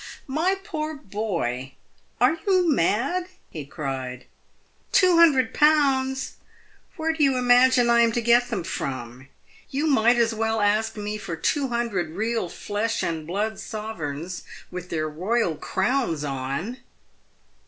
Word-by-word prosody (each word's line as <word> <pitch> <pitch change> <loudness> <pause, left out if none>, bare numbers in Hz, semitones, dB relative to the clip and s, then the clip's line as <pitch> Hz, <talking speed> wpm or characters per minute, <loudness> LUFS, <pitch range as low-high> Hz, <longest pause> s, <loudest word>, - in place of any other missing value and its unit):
My 325 +8 +1
poor 315 -6 -4
boy! 180 - -3 0.5
are 250 +6 +4
you 370 -2 +4
mad 275 - +1
?" - - -38
he 150 -4 -7
cried. 130 -4 -5 0.3
" - - -39
2001.! 295 - +4 0.8
where 320 0 -1
do 320 -2 0
you 270 -2 +3
imagine 250 0 +5
I 235 0 +4
am 230 -1 +4
to 240 - +1
get 240 +1 +4
them 225 -7 -2
from? 130 -6 -5 0.4
Tou 285 +3 -1
might 240 -5 +4
as 230 -1 +2
well 225 0 0
ask 215 +2 +1
me 210 0 -4
for 170 -5 -5
two 275 - 0
hundred 220 -9 -2
real 225 -2 -1
flesh 215 +5 -2
and 160 -2 -3
blood 205 +4 -2
Sovereigns 180 -6 -5 0.3
with 180 0 -7
their 155 -1 -1
royal 180 +5 0
crowns 190 - -1
on!" 140 - -3
225 Hz, 135 wpm, -24 LUFS, 170-265 Hz, 0.8 s, imagine